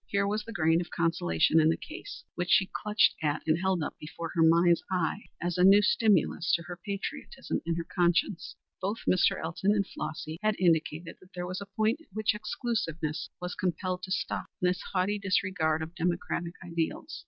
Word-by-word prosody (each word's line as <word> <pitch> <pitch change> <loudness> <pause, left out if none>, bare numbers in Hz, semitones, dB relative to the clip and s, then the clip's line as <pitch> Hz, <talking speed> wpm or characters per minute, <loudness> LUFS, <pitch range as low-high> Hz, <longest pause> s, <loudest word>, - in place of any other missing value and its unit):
Here 200 -1 +1
was 210 +2 -1
the 230 - -9
grain 165 -3 +2
of 175 - -7
consolation 160 - +2
in 155 - +4
the 165 - +1
case, 360 +10 -9
which 175 0 -3
she 195 -2 +4
clutched 210 -1 +3
at 150 -2 0
and 160 +1 +2
held 190 -3 +1
up - - -4
before 165 +2 -6
her 170 - +1
mind's 170 +1 +5
eye 185 +3 -1
as 175 0 -2
a - - +5
new 200 +2 +7
stimulus 210 -6 +2
to 170 - -4
her 175 +2 -8
patriotism 200 - -4
and 170 0 0
her 170 - -2
conscience. 175 +1 +1 0.3
Both 200 +4 -2
Mr. 185 - +3
Elton 175 +5 0
and 200 -2 +1
Flossy 155 0 -6
had 215 0 +2
indicated 165 -1 +1
that 185 - -20
there 180 0 -3
was 185 +2 -4
a 200 - -7
point 220 +8 0
at - - -20
which 215 +1 +1
exclusiveness 170 -8 -3
was 180 0 -4
compelled 185 0 -2
to 185 - -7
stop - - -2
in 180 - +3
its 180 0 -2
haughty 195 +2 0
disregard 185 -5 +1
of 160 +2 -8
democratic 175 0 -2
ideals. 170 - -3
180 Hz, 195 wpm, -29 LUFS, 165-200 Hz, 0.3 s, new